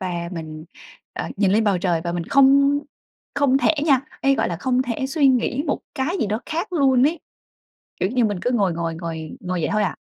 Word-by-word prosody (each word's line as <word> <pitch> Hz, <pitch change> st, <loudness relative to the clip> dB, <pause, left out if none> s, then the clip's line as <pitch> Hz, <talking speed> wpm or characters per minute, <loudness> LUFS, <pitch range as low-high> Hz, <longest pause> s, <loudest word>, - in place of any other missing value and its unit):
và 175 Hz, -2 st, -3 dB
mình, 155 Hz, -2 st, -7 dB, 0.5 s
ờ, -, -, -4 dB
nhìn 195 Hz, -2 st, +2 dB
lên 220 Hz, +2 st, +3 dB
bầu 200 Hz, -3 st, +2 dB
trời 175 Hz, -2 st, 0 dB
và 170 Hz, -, -2 dB
mình 170 Hz, -1 st, -3 dB
không 275 Hz, +3 st, +4 dB, 0.6 s
không 275 Hz, -2 st, +3 dB
thể 310 Hz, -, +2 dB
nha, 275 Hz, -5 st, +4 dB, 0.2 s
ê, 275 Hz, 0 st, +3 dB
gọi -, -, 0 dB
là 170 Hz, -, -3 dB
không 255 Hz, +7 st, 0 dB
thể 255 Hz, +1 st, -3 dB
suy 280 Hz, 0 st, +2 dB
nghĩ 255 Hz, +1 st, +1 dB
một 285 Hz, -, -1 dB
cái 290 Hz, +8 st, -1 dB
gì -, -, +1 dB
đó 215 Hz, +3 st, -2 dB
khác 335 Hz, +5 st, -3 dB
luôn 270 Hz, -5 st, +4 dB
ấy. 325 Hz, +1 st, -2 dB, 0.8 s
Kiểu 185 Hz, -, 0 dB
như 245 Hz, 0 st, +2 dB
mình 205 Hz, -4 st, -2 dB
cứ 245 Hz, -, 0 dB
ngồi, 200 Hz, -8 st, +1 dB
ngồi, 165 Hz, 0 st, -3 dB
ngồi, 160 Hz, -2 st, -6 dB
ngồi 180 Hz, 0 st, -3 dB
vậy -, -, -1 dB
thôi 215 Hz, 0 st, +1 dB
à. 185 Hz, -, -2 dB
230 Hz, 225 wpm, -22 LUFS, 175-275 Hz, 0.8 s, không